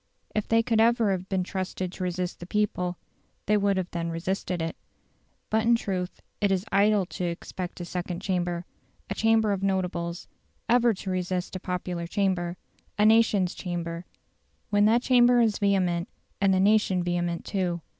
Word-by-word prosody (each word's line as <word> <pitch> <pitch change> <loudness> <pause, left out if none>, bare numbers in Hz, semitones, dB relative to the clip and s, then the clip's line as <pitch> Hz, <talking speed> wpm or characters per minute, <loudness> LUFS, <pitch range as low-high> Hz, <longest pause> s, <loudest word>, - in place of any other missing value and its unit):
If 215 - -1
they 225 0 +3
could 225 -2 +2
ever 230 -2 +3
have 185 0 -3
been 190 -2 0
trusted 185 -1 -4
to 185 - -6
resist 180 0 -3
the 175 - -8
people, 180 -4 -1 0.5
they 210 - +3
would 200 -1 +2
then 170 -1 -2
have 165 - -3
resisted 180 +1 -2
it. 165 0 -3 0.8
But 220 - +3
in 235 +1 +4
truth 185 -5 -3 0.2
it 205 -1 +3
is 190 +1 0
idle 205 0 +4
to 180 - -6
expect 175 +1 -5
a - - -4
second 175 0 -4
chamber 175 -2 -2 0.5
a - - +2
chamber 225 -1 +3
of 195 -1 -1
notables 180 -3 -2 0.4
ever 240 -1 +4
to 190 0 -5
resist 185 0 -2
a - - -3
popular 180 -2 -3
chamber, 180 -2 0 0.4
a 210 - +4
nation's 215 -4 +4
chamber, 170 -1 -5 0.6
when 205 0 +4
that 235 +3 +4
chamber 245 -1 +5
is 225 -3 +2
vehement 185 -4 +1 0.3
and 195 -1 +4
the 190 - +3
nation 195 -2 +3
vehement 175 -1 -1
too. 180 -4 -1
190 Hz, 170 wpm, -27 LUFS, 175-210 Hz, 0.8 s, chamber